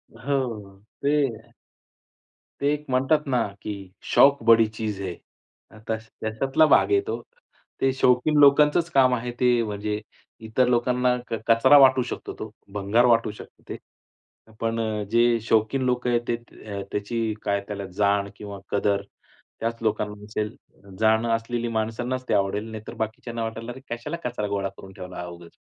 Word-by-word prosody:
हो, 115 -6 -3 0.2
ते 145 +1 +2 1.5
ते 145 +1 +2
एक 150 0 -5
म्हणतात 135 +4 +2
ना, 125 -3 +2 0.2
की 100 -3 -7 0.2
शौक 140 -1 +6
बड़ी 115 0 +6
चीज 110 -2 -4
है 95 -2 -3 0.6
अ, - - -15
तस 110 0 -3
त्याच्यातला 135 +8 +2
भाग 155 - +4
आहे 400 0 +4
तो. 440 - -3 0.6
ते 135 - +3
शौकीन 130 +3 +3
लोकांचंच 150 +4 +5
काम 130 -3 +5
आहे, 120 0 -4
ते 125 -2 +4
म्हणजे, 105 0 -3 0.5
इतर 125 +3 +2
लोकांना 125 +1 +2
क - - -6
कचरा 120 +5 +6
वाटू 130 -2 +6
शकतो - - -6
तो, 110 - -5 0.2
भंगार 105 +4 +2
वाटू 115 -3 +3
शकतं 105 - -14
ते. - - -5 0.8
पण 115 0 -1
अ, 110 -2 -1
जे 120 0 +4
शौकीन 110 +4 +2
लोक 125 0 0
आहेत 120 -1 +2
तेत 120 0 -4
अ, 100 -2 -7
त्याची 110 +2 -2
काय 100 -1 +1
त्याला 100 -1 -5
जाण 100 -1 +2
किंवा 100 -1 -8
कदर, 100 0 +1 0.6
त्याच 115 0 -2
लोकांना 105 -1 -2
असेल. 105 +1 -3 0.4
जाणं 110 +1 +3
असलेली 120 +1 -3
माणसांनाच 120 +4 -2
ते - - +2
आवडेल, 105 +3 0
नाहीतर 110 0 -8
बाकीच्यांना 115 +1 -4
वाटेल, 115 +1 -5
"अरे, 120 - -7
कशाला 120 +8 -4
कचरा 120 -4 -2
गोळा 100 -1 -2
करून 95 0 -13
ठेवला 90 -1 -9
हा 90 - -4
उगीच." 85 -1 -12
115 Hz, 160 wpm, -25 LUFS, 105-125 Hz, 1.5 s, शौक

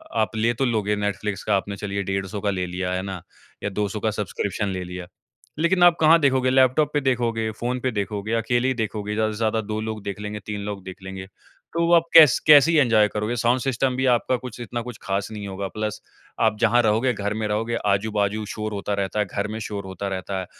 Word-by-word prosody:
आप 110 0 0
ले 115 +2 +1
तो 135 - -1
लोगे 105 -4 0
नेटफ़्लिक्स 105 -1 -3
का, 105 - +2
आपने 100 +1 -2
चलिए 100 0 -3
डेढ़ 95 0 -2
100 100 +1 -5
का 105 - 0
ले 90 -2 -1
लिया, 90 +1 -3
है 90 - -1
ना? 95 -3 -5 0.4
या 105 - 0
200 105 +1 -2
का 110 - 0
सब्सक्रिप्शन 105 0 -3
ले 95 -1 -3
लिया। 90 0 -7 0.5
लेकिन 175 +2 +3
आप 175 -1 +7
कहाँ 160 +1 +6
देखोगे? 130 -3 +2
लैपटॉप 130 +3 +3
पे 145 - +1
देखोगे? 115 -4 0
फोन 125 +1 -2
पे 130 0 -1
देखोगे? 105 +1 -3
अकेले 120 +2 +1
ही 130 - +2
देखोगे 105 -3 -3
ज़्यादा 110 0 +1
से 105 - -7
ज़्यादा 110 0 0
2 105 +1 -4
लोग 110 -2 -5
देख 100 0 -5
लेंगे, 105 0 -5
3 105 -1 -4
लोग 100 -2 -5
देख 95 -1 -9
लेंगे। 95 0 -7 0.5
तो 170 - 0
व - - 0
वो 175 - +3
आप 165 -1 +6
कैस 155 -5 +9
कैसे 150 +2 +8
ही 165 - +3
एन्जॉय 110 -5 +4
करोगे? 105 +3 -2
साउंड 120 +2 +2
सिस्टम 130 0 0
भी 130 +1 0
आपका 125 +2 +1
कुछ 125 -1 -9
इतना 120 +1 -4
कुछ 120 -2 -8
खास 100 0 -2
नहीं 105 -2 -6
होगा। 95 0 -4
प्लस 110 -1 -3 0.4
आप 110 -2 +3
जहाँ 120 +1 +4
रहोगे 115 +3 +2
घर 105 -1 -3
में 110 0 -2
रहोगे, 115 +3 -1
आजू-बाजू 105 +1 0
शोर 110 -1 -4
होता 100 0 -3
रहता 100 +1 -2
है, 105 - +2
घर 100 +2 -3
में 110 +1 -5
शोर 100 -2 -5
होता 95 +1 -5
रहता 95 0 -3
है। - - -6
105 Hz, 240 wpm, -23 LUFS, 100-120 Hz, 0.5 s, कैस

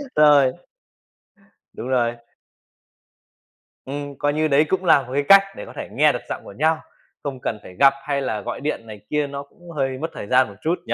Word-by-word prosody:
Rồi. 145 -3 +6 1.2
Đúng 125 - -7
rồi. 120 -2 +1 1.7
Ừm, 145 +1 -6
coi 145 0 0
như 155 +1 +1
đấy 145 +1 +4
cũng 190 -1 0
là 150 -4 +6
một 125 0 -9
cái 145 0 +1
cách 195 0 +10
để - - -7
có - - -12
thể - - -6
nghe - - +4
được - - -4
giọng - - -4
của - - -11
nhau, 160 +2 +3 0.5
không 135 -3 -4
cần 110 - -3
phải 90 - -12
gặp 140 0 +7
hay 140 -1 -1
là 110 -5 -2
gọi - - -5
điện 140 -6 -3
này 105 -1 -9
kia, 150 -1 0
nó 140 0 -6
cũng 175 +4 -16
hơi 135 -4 -2
mất 160 - -1
thời 100 - -7
gian 130 +1 +4
một 100 - -12
chút 165 +3 +2
nhỉ? - - -1
140 Hz, 215 wpm, -22 LUFS, 130-150 Hz, 1.7 s, cách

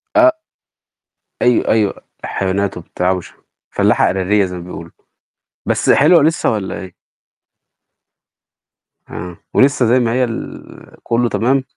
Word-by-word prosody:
آ 320 0 +6 1.1
أيوة، 125 -1 +2
أيوة 105 -3 +1 0.2
الحيوانات 95 0 -2
وبتاع 90 +1 -2
وش 90 -2 -5 0.4
فلاّحة - - +2
إعدادية 95 +2 +1
زي 90 0 -6
ما 85 - -8
بيقولوا. 85 -2 -9 0.8
بس - - +1
حلوة 160 +3 +5
لسه 160 +3 +1
والّا 105 -4 -3
إيه؟ 95 -2 -10 2.2
آه، 90 0 -7 0.2
ولسه 135 -2 +3
زي 120 +3 +3
ما 115 -2 0
هي 125 +1 +1
ال 115 -2 -7
كله 120 0 0
تمام؟ 130 +4 +1
110 Hz, 120 wpm, -17 LUFS, 95-130 Hz, 2.2 s, آ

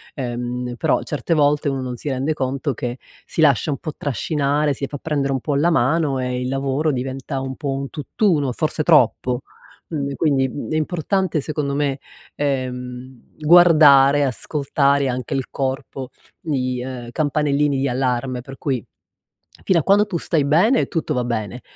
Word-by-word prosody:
Ehm, 125 -1 -4
però, - - +1
certe 150 +3 -2
volte 145 -1 +2
uno 135 -1 -2
non 125 -1 -4
si 145 - -4
rende 135 +3 -1
conto 135 0 -2
che 120 +1 -4 0.3
si - - -2
lascia 145 -1 +4
un 140 - -2
po' 155 - -6
trascinare, 145 +1 0
si 140 +1 -4
fa 145 - -6
prendere 140 -2 -1
un 135 - 0
po' 145 +3 -2
la 150 +5 +3
mano, 145 0 +2
e 125 0 -2
il 125 - -2
lavoro 135 +3 0
diventa 135 +1 -4
un 135 0 -4
po' 145 0 -4
un 135 0 -4
tutt'uno, 150 - 0
forse 155 +4 -1
troppo. 130 -5 +3 0.5
Quindi 140 -3 -3
quindi, 135 -4 +1
mhmm, 140 - -6
è - - 0
importante 175 +2 0
secondo 140 -1 -2
me, 140 -1 0 0.4
ehm, 130 -2 -4
guardare, 150 -4 +6
ascoltare, 140 +1 +1
anche 125 +1 -3
il 135 -1 -2
corpo 135 -1 -4 0.3
di 130 -5 -2
uhm, 125 -2 -6
campanellini 145 -1 +1
di 135 +1 0
allarme, 125 0 -1
per 135 +2 -11
cui, 130 -7 -2 0.8
fino 180 -3 +3
a - - -2
quando 205 +4 +4
tu 175 - -2
stai 160 -2 0
bene 180 - +3
tutto 160 -3 -2
va 125 -3 0
bene, 120 0 -3
140 Hz, 170 wpm, -21 LUFS, 130-150 Hz, 0.8 s, guardare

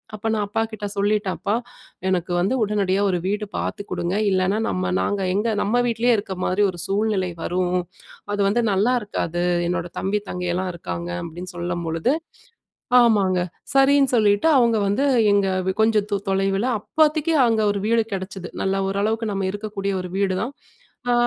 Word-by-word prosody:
அப்ப 220 +2 -3
நான் 210 -2 0
அப்பாகிட்ட 220 0 -3
சொல்லிட்டேன், 205 -1 +1
"அப்பா, 205 +2 -1 0.5
எனக்கு 180 -1 0
வந்து 195 +8 +1
உடனடியா 200 -2 +1
ஒரு 180 - +1
வீடு 210 +1 -1
பாத்து 205 - -3
குடுங்க. 175 +1 -1 0.2
இல்லனா 190 +2 +1
நம்ம 90 0 -1
நாங்க 200 - -1
எங்க 210 +3 +1
நம்ம 245 +4 +2
வீட்லேயே 235 +1 +2
இருக்க 200 -2 -4
மாரி 195 +3 +2
ஒரு 175 - -10
சூழ்நிலை 195 -2 0
வரும். 180 0 0 0.6
அது 205 - 0
வந்து 235 +4 +2
நல்லாருக்காது. 200 -5 0 0.2
என்னோட 175 -1 -2
தம்பி 205 +2 0
தங்கைலாம் 180 +1 -2
இருக்காங்க" 85 - -5
அப்படீன்னு 175 +3 -8
சொல்லும்பொழுது 175 - -1 0.9
ஆமாங்க. 200 -6 +3 0.4
சரின்னு 275 0 +5
சொல்லிட்டு 210 +5 +3
அவங்க 235 -3 +4
வந்து 205 +8 +1 0.3
எங்க 200 -1 +3 0.3
கொஞ்ச 220 0 +3
து 200 - +1
தொலைவில, 195 +3 +1
அப்போதைக்கு 310 +4 +2
அங்க 225 -1 +2
ஒரு 205 - -1
வீடு 230 0 +3
கிடைச்சது. 190 -1 -5
நல்லா 195 0 0
ஓரளவுக்கு 215 +3 -1
நம்ம 195 -1 -1
இருக்கக்கூடிய 205 -2 -3
ஒரு 180 - -7
வீடு 190 -2 +1
தான். 255 +4 -3 0.6
ஆ - - +4
200 Hz, 150 wpm, -22 LUFS, 185-220 Hz, 0.9 s, சரின்னு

